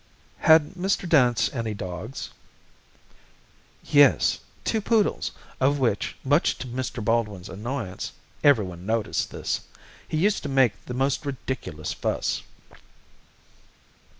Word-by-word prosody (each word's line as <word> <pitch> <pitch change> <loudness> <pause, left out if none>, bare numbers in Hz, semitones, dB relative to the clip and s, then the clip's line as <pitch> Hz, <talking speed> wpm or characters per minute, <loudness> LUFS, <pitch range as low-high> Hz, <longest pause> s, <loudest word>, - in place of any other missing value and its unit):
"Had 160 +1 +5
Mr. 185 0 -1
Dance 125 -8 +4
any 115 -4 -2
dogs?" 95 +6 -6 1.5
"Yes 145 -2 +5 0.2
two 220 - 0
poodles, 215 0 +1 0.3
of 140 +2 +3
which, 120 -7 0
much 145 +4 +2
to - - -6
Mr. 125 -2 -4
Baldwin's 105 -5 0
annoyance 110 -1 -4 0.3
(everyone 100 -11 +3
noticed 110 +1 -1
this), - - -2 0.5
he 155 - -2
used 200 +6 +2
to 150 - -4
make 135 -5 +4
the 125 - -4
most 135 +3 0
ridiculous 125 - -4
fuss." - - -1
130 Hz, 110 wpm, -25 LUFS, 105-145 Hz, 1.5 s, Had